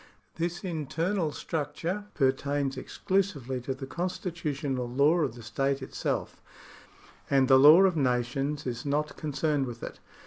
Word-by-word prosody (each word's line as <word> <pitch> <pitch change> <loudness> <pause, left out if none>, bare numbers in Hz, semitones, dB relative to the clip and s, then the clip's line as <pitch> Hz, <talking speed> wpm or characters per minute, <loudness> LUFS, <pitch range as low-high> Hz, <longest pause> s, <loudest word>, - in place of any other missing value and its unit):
This 175 +2 -2
inter 165 +1 -2
nal 170 -7 0
structure 165 +7 -3
pertains 140 0 +1
exclusively 140 -4 -1
to 130 +2 -3
the 135 - -7
constitutional 150 -6 -3
law 145 +7 +3
of 135 -8 0
the 120 - -11
state 135 +5 -1
itself, - - -3 0.9
and 135 -2 +4
the 130 0 +7
law 155 +7 +9
of 190 -3 +3
nations 135 +2 0
is 120 -1 -3
not 150 +1 -1
concerned 150 -2 -1
with 120 -1 -8
it. - - -7
145 Hz, 140 wpm, -28 LUFS, 130-165 Hz, 0.9 s, law